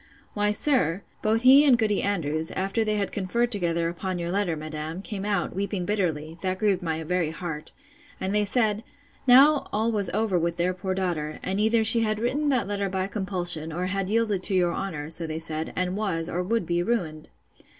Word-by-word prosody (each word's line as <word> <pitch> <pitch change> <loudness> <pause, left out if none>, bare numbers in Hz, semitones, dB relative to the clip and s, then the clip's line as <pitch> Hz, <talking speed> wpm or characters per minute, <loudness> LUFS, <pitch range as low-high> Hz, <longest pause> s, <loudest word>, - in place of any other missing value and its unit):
Why, 210 0 +1
sir, 210 - +1 0.2
both 220 +2 +1
he 270 +3 +8
and 270 -5 +5
Goody 215 -3 +1
Andrews, 160 -5 0
after 195 +4 -1
they 215 -1 0
had 205 -1 -1
conferred 235 +5 -1
together 170 -5 +1
upon 180 +2 -4
your 170 0 -3
letter, 195 -3 0
madam, 155 +3 -6
came 200 -2 -5
out, 200 -5 -1
weeping 195 -1 -2
bitterly, 165 -5 -2
that 185 -1 -1
grieved 200 -2 +1
my 160 -2 -3
very 175 0 -1
heart; 160 -2 -6 0.5
and 190 +1 -2
they 210 0 +2
said, 215 0 +1 0.4
Now 275 +4 +6
all 220 +2 0
was 205 -5 -1
over 205 -3 0
with 170 +1 -2
their 180 +2 +1
poor 185 +1 -4
daughter; 165 -5 -2
and 190 +2 -2
either 220 +1 +3
she 225 +2 +6
had 215 -1 0
written 275 +7 -1
that 250 -7 +1
letter 200 -1 -2
by 190 0 -2
compulsion, 180 -6 +1
or 175 +3 -3
had 195 0 -2
yielded 215 -3 +1
to 195 0 +2
your 175 -2 +2
honour; 160 -6 -5
so 165 0 +1
they 155 0 -4
said; 160 0 -2
and 185 0 -1
was, 180 -6 -2
or 180 - -1
would 225 +2 -1
be 170 +1 0
ruined! 175 -8 -3
190 Hz, 200 wpm, -25 LUFS, 170-215 Hz, 0.5 s, he